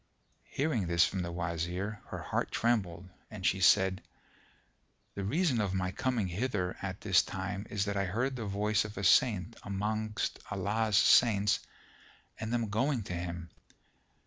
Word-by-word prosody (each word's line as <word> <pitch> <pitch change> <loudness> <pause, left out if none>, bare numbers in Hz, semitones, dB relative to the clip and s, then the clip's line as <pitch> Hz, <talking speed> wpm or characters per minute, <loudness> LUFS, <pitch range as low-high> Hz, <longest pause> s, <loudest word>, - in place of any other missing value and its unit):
Hearing 135 - 0
this 85 -1 +4
from 95 - -2
the 85 -1 -4
Wazir, 90 +4 -3
her - - -6
heart - - -1
trembled 95 -7 0 0.2
and 105 -4 -7
she 95 - +2
said, 95 +1 +4 1.1
"The 100 - -4
reason 140 - +1
of 95 -2 -1
my 95 -1 -1
coming 120 -3 -1
hither 90 -1 -2
at 95 -1 -5
this 95 -4 +4
time 95 +2 -5
is 100 -1 -1
that 100 -1 -2
I 100 - +1
heard 125 +8 -1
the 115 -3 -4
voice 105 +1 +1
of 105 -2 -8
a 100 - -3
saint 105 0 +3
amongst 105 +1 -2
Allah's 105 +2 0
Saints 105 -4 +5 0.8
and 110 +1 -4
am 115 -3 0
going 125 +2 +1
to 90 - -6
him." 85 -1 -5
100 Hz, 155 wpm, -31 LUFS, 95-110 Hz, 1.1 s, Saints